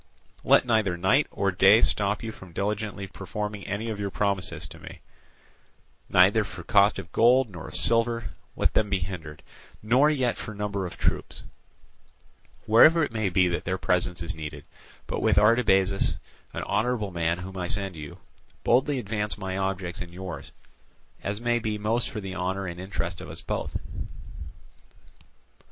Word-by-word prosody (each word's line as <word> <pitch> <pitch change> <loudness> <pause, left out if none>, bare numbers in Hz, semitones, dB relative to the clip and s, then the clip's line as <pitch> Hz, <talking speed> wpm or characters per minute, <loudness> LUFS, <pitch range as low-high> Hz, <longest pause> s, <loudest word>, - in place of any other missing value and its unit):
Let - - +5
neither 110 -7 +1
night 100 +12 +3
nor 100 0 0
day 100 +3 +6
stop 100 +1 +1
you 115 - -4
from 95 -5 -13
diligently 100 +1 -2
performing 105 +2 -6
any 105 +3 -3
of 105 - -5
your 100 -1 -2
promises 95 -6 -2
to - - -12
me; - - -11 1.1
neither - - +5
for - - -9
cost - - +4
of - - -8
gold 120 0 +4
nor 85 -3 -8
of - - -8
silver 115 0 +2 0.2
let - - +1
them 105 -1 +2
be 100 - +2
hindered, 85 -4 -6 0.4
nor 125 +7 +4
yet 130 -6 0
for 110 - -6
number 100 -2 -2
of - - -10
troops, - - -2 1.2
wherever 155 +9 +6
it 140 - -2
may 110 -3 0
be 90 0 +3
that 85 - -2
their 95 +1 -1
presence 90 -2 0
is 90 +2 -4
needed; 75 -2 -7 0.4
but - - -3
with - - +2
Artabazus, 105 -3 +3 0.4
an - - -4
honourable 105 -1 0
man 85 0 0
whom 95 +1 -8
I 90 -1 -3
send 95 -1 -2
you, 75 -2 -8 0.5
boldly 135 +4 +3
advance 105 -3 -3
my 95 -2 -4
objects 95 -2 -2
and 85 - -7
yours, 90 -1 -7 0.7
as 100 +1 -3
may 120 0 +1
be 110 -2 -2
most 110 +3 0
for 110 - -5
the 95 -2 -6
honour 95 +1 -2
and 85 -1 -6
interest 85 -3 -4
of - - -9
us - - -8
both." - - -3
100 Hz, 165 wpm, -26 LUFS, 90-110 Hz, 1.2 s, day